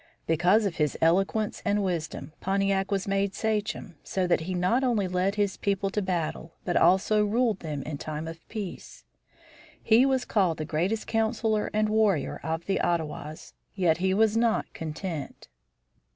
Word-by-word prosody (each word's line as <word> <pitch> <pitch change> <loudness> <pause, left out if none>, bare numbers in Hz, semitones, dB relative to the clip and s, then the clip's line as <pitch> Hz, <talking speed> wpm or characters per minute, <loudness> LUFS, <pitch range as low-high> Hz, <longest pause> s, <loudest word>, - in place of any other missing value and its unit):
Because 180 +7 +3
of 190 -4 -2
his 150 -3 0
eloquence 195 +6 +1
and 205 0 +1
wisdom, 165 -4 -3
Pontiac 195 0 +1
was 195 -1 -1
made 195 0 0
sachem, 210 -5 -2
so 190 -1 -1
that 175 - +2
he 180 +3 -4
not 185 +9 +2
only 225 -7 +1
led 185 +2 0
his 205 -2 0
people 195 -1 -1
to 210 - -1
battle, 170 -3 -3
but 175 - -1
also 210 +3 +4
ruled 220 -1 +1
them 150 -4 -4
in 145 -1 -5
time 155 +1 -5
of 165 0 -7
peace. 205 -5 -7 0.8
He 230 +3 +5
was 260 -2 +1
called 185 -6 +1
the 155 - -3
greatest 180 +8 -1
councilor 220 -1 0
and 215 0 +1
warrior 210 -8 +1
of 160 +1 -3
the 195 - 0
Ottawas; 155 -2 -3 0.2
yet 175 -5 +2
he 190 +1 +1
was 215 +2 +3
not 230 -1 +2
content. 160 -1 -6
190 Hz, 165 wpm, -27 LUFS, 165-210 Hz, 0.8 s, He